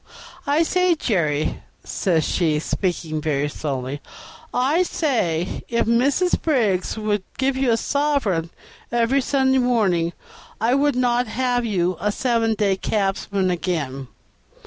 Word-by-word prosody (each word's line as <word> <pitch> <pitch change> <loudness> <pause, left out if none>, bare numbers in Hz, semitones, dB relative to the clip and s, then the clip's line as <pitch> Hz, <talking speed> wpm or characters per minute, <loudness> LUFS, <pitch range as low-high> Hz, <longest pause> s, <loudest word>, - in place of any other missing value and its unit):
"I 295 +4 +3
say, 365 +1 +2
Jerry," 155 - 0 0.2
says 165 -5 0
she, 160 -3 +1
speaking 160 -1 -2
very 145 -2 0
slowly, 140 -1 -4 0.5
"I 275 +8 +2
say, 205 - -1
if 235 0 +1
Mrs. 275 +10 +2
Briggs 220 - +1
would 210 -2 0 0.2
give 265 0 +1
you 265 -1 +1
a 230 - +3
sovereign 270 - 0 0.4
every 240 +3 +2
Sunday 265 0 +2
morning, 195 -9 +1 0.5
I 230 +3 +2
would 285 +1 +2
not 245 -1 +1
have 245 +1 0
you 185 -5 0
a 210 - +1
seven 230 -1 +1
days' 200 -3 +1
cabman 195 -2 0
again. 150 -7 -3
220 Hz, 125 wpm, -22 LUFS, 170-260 Hz, 0.5 s, I